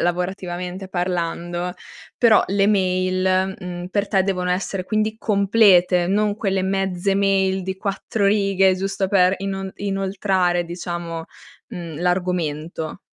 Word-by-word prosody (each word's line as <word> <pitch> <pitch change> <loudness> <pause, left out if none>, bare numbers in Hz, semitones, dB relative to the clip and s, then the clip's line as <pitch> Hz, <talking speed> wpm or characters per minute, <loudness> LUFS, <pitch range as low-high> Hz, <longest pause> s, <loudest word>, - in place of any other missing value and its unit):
lavorativamente 180 +1 -3
parlando, 175 -1 -2 0.4
però 225 -3 +5
le 195 +1 +2
mail, 185 -1 +1
mhmm, 180 -1 -6
per 200 +1 -1
te 195 -2 +3
devono 180 -2 -1
essere 185 0 -2
quindi 215 +2 -1
complete, 195 -4 +4
non 205 +2 +1
quelle 195 -3 0
mezze 195 0 0
mail 195 -1 +2
di 190 +1 -4
4 200 +1 -2
righe, 195 -2 +3
giusto 195 +1 -2
per 185 -1 +4
inon 195 0 -4
inoltrare 190 -3 0
diciamo, 170 -1 -5 0.4
mhmm, 170 -7 -7
l'argomento. 175 -3 -2
190 Hz, 120 wpm, -21 LUFS, 180-195 Hz, 0.4 s, però